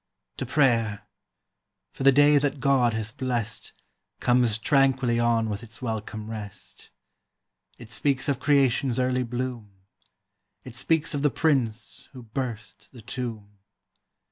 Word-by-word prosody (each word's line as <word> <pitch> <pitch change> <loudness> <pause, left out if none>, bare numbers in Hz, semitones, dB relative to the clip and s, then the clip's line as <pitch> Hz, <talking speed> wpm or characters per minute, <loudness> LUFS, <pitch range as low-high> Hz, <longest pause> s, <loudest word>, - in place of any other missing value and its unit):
To 130 - -4
prayer; 115 -7 +2 0.9
for - - -10
the 135 +1 +7
day 145 +2 +5
that 140 0 -1
God 130 -3 +3
has 110 0 -3
blest 120 -4 -4 0.5
Comes 120 -3 +2
tranquilly 130 -1 +2
on 115 -1 +2
with 105 -1 -4
its 115 -1 -12
welcome 110 -2 -5
rest. 105 -3 -8 0.9
It 115 -2 -12
speaks 135 +2 0
of 140 -3 0
creation's 135 -4 +2
early 130 0 +1
bloom; 125 -2 -4 0.9
It 125 - -10
speaks 160 +7 +1
of 145 - -1
the 145 - +3
Prince 125 -5 -1
who 130 -2 -10
burst 115 -1 -6
the 120 - -12
tomb. 110 -3 -6
120 Hz, 130 wpm, -26 LUFS, 110-135 Hz, 0.9 s, the